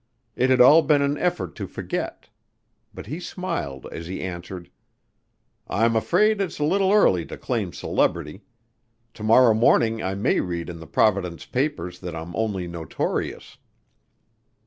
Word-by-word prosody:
It 130 +1 +1
had 130 - +4
all 145 +6 +8
been 145 -3 +3
an 140 +1 +1
effort 95 - -1
to - - -5
forget. - - -5 0.6
But - - -10
he 150 +10 -5
smiled 170 - -5
as 80 0 -7
he 95 - -5
answered. 90 -1 -7 1.0
"I'm 115 +1 +1
afraid 200 - +2
it's 185 -4 -3
a 150 - -1
little 190 +5 +2
early 95 - +4
to - - -8
claim - - -2
celebrity. 85 +3 -1 0.7
To - - -13
morrow 115 +2 +6
morning 110 0 +3
I 95 +1 -2
may 100 - +1
read 85 -2 -3
in 85 - -10
the 80 - -11
Providence 90 -6 +1
papers 125 - -2
that 90 -3 -6
I'm 80 +1 -7
only 100 -5 -2
notorious." 85 -3 -4
110 Hz, 150 wpm, -24 LUFS, 85-145 Hz, 1.0 s, all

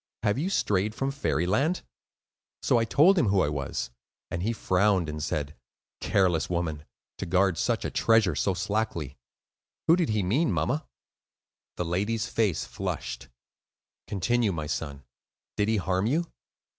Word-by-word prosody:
Have 105 +3 +1
you 175 +6 0
strayed 105 - +1
from 135 0 -1
Fairyland?' 135 - 0 0.8
"So 120 - +4
I 115 - +1
told 170 - +5
him 125 - +2
who 100 -1 +3
I 75 - +2
was, 70 -3 -3 0.4
and 85 - -2
he 110 +5 0
frowned 95 -4 +2
and 75 0 -4
said, 75 0 -2 0.4
'Careless 85 -6 +2
woman, 80 -4 -2 0.3
to 95 - -3
guard 95 0 +3
such - - 0
a - - -2
treasure 110 -6 +3
so 95 +5 +1
slackly.' 95 - -2 0.7
Who 165 - +6
did 175 -3 0
he 105 -2 +1
mean, 130 - +2
mamma?" 145 +4 -1 0.9
The 90 - -1
lady's 105 +6 0
face 110 -7 0
flushed. - - -5 0.8
"Continue, 110 +3 +1
my 80 -4 -3
son; 75 -2 -4 0.5
did 105 -1 +1
he 110 0 +2
harm 95 +1 0
you?" 160 +8 +1
100 Hz, 150 wpm, -27 LUFS, 85-115 Hz, 0.9 s, Who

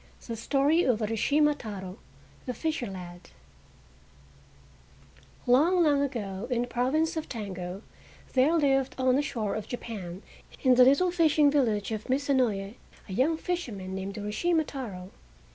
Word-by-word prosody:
THE 230 - -4
STORY 280 +8 +2
OF 245 -4 +2
URASHIMA 280 +8 +2
TARO, 190 -4 -7 0.5
THE 250 - -3
FISHER 315 -3 -2
LAD 180 -2 -9 2.2
Long, 320 +9 +4
long 290 -3 +3
ago 225 -6 -3
in 240 -1 +1
the - - -5
province 275 +8 0
of 320 - -4
Tango 190 -3 -6 0.5
there 265 +5 +4
lived 270 -4 +2
on 260 -1 +3
the 280 - +3
shore 220 -8 -3
of 215 - -4
Japan 200 -7 -6 0.4
in 260 -2 +6
the 250 0 +7
little 315 +8 +4
fishing 310 -4 +4
village 225 -8 +1
of 215 +1 -5
Mizu 280 +2 +1
no 255 -3 +4
ye 195 +3 -6 0.3
a 190 - -6
young 275 - +2
fisherman 235 - -4
named 190 +1 -5
Urashima 315 +11 0
Taro. 200 -11 -7
250 Hz, 145 wpm, -28 LUFS, 205-290 Hz, 2.2 s, the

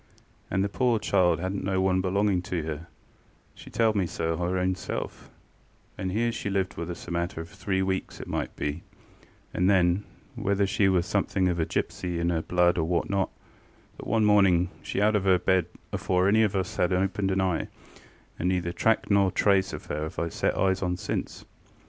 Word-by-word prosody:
And 95 - +1
the - - +1
pore 120 +2 +1
child 90 -6 +2
hadnŌĆÖt 95 +3 -2
no 95 -1 0
one 95 0 +2
belonging 95 0 +1
to 90 -2 -3
herŌĆöshe 80 +1 -11
telled 110 -2 +2
me 95 -4 +1
so 80 0 -2
her 90 +2 -1
own 90 0 +1
selfŌĆöand 95 0 -8
here 115 +4 +1
she 100 - -4
lived 95 -1 -1
with 85 +1 -5
us 85 - -7
a - - -6
matter 85 0 -2
of 80 +1 -6
three 95 +1 -1
weeks 95 0 -3
it - - -6
might - - -3
be; 75 +3 -3 0.7
and 90 +2 +2
then, 90 0 +3 0.3
whether 100 0 +1
she 95 0 +2
were 90 -2 +3
somethink 95 0 0
of 85 -1 -1
a 80 - 0
gipsy 90 -2 -2
in 85 +1 +1
her 80 -1 0
blood 90 +1 +2
or 80 - +1
what 85 +2 0
not, 100 -1 +1 0.7
but - - -9
one 110 0 +2
morning 95 -4 +4
she - - -3
out 105 +1 +3
of 100 -2 +1
her 95 -1 +5
bed 90 -1 +2 0.3
afore 90 0 +1
any 110 +2 +4
of 105 -2 +2
us 95 -2 -2
had 90 - +2
opened 95 +1 0
a 95 0 +1
eye, 95 -3 0 0.7
and 90 - +1
neither 90 -2 0
track 110 +4 +1
nor 100 -1 +5
yet 95 - -4
trace 95 -1 +3
of 75 - -7
her 75 - -3
have 80 +2 -5
I 85 - -1
set - - -1
eyes 95 -1 +2
on 90 -1 -1
since. - - -4
95 Hz, 205 wpm, -27 LUFS, 85-100 Hz, 0.7 s, her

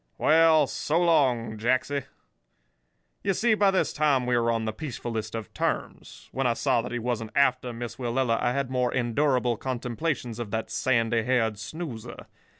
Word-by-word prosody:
Well, 160 -1 +5
so 150 +3 -1
long, 130 -10 +2
Jacksy.' 130 +4 0 1.2
"You 195 - +1
see, 235 +3 +3
by 205 -2 +4
this 190 -1 +1
time 145 -4 +2
we 125 0 +1
were 115 -1 +2
on 115 -1 0
the 110 - -2
peacefullest 115 -4 -5
of 110 -4 -6
terms. - - -4
When 135 -1 0
I 120 - +2
saw 130 -3 +1
that 125 - -7
he 120 - -2
wasn't 115 -2 -2
after 130 -3 +2
Miss 120 0 -6
Willella, 120 -1 0
I 120 - +1
had 135 0 -2
more 125 -1 +1
endurable 125 -1 +1
contemplations 125 0 -3
of 120 -3 -4
that 110 +1 -3
sandy 115 -1 +1
haired 110 -3 0
snoozer. 125 -1 -7
125 Hz, 165 wpm, -26 LUFS, 115-140 Hz, 1.2 s, Well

